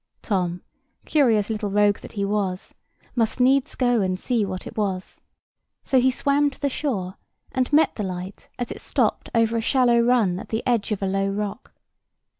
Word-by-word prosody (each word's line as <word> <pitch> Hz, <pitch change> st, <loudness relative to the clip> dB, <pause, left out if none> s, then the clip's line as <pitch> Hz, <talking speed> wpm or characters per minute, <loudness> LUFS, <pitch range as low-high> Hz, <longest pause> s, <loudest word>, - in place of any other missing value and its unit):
Tom, 180 Hz, -4 st, -1 dB, 0.4 s
curious 230 Hz, -8 st, +2 dB
little 210 Hz, -1 st, -2 dB
rogue 205 Hz, 0 st, +3 dB
that -, -, -11 dB
he 200 Hz, -2 st, -1 dB
was, 195 Hz, -2 st, -2 dB, 0.4 s
must 230 Hz, 0 st, +1 dB
needs 265 Hz, +1 st, +3 dB
go 245 Hz, -3 st, +2 dB
and 185 Hz, -1 st, -1 dB
see 240 Hz, -1 st, 0 dB
what 185 Hz, -2 st, -4 dB
it -, -, -9 dB
was; 190 Hz, -3 st, -3 dB, 0.6 s
so 260 Hz, -, +3 dB
he 260 Hz, -, +4 dB
swam 285 Hz, +2 st, +2 dB
to 270 Hz, -, -16 dB
the 285 Hz, -, 0 dB
shore, 205 Hz, -10 st, -3 dB, 0.3 s
and 255 Hz, +1 st, -1 dB
met 305 Hz, +2 st, +4 dB
the 210 Hz, -, -2 dB
light 185 Hz, 0 st, -6 dB
as 245 Hz, -, -4 dB
it -, -, -7 dB
stopped -, -, 0 dB
over 230 Hz, 0 st, +3 dB
a -, -, 0 dB
shallow 240 Hz, 0 st, +3 dB
run 235 Hz, -7 st, +2 dB
at -, -, -10 dB
the 220 Hz, +1 st, -2 dB
edge 235 Hz, -4 st, +1 dB
of 205 Hz, -2 st, -2 dB
a -, -, +2 dB
low 195 Hz, +1 st, 0 dB
rock. 205 Hz, +3 st, -4 dB
215 Hz, 190 wpm, -23 LUFS, 195-250 Hz, 0.6 s, he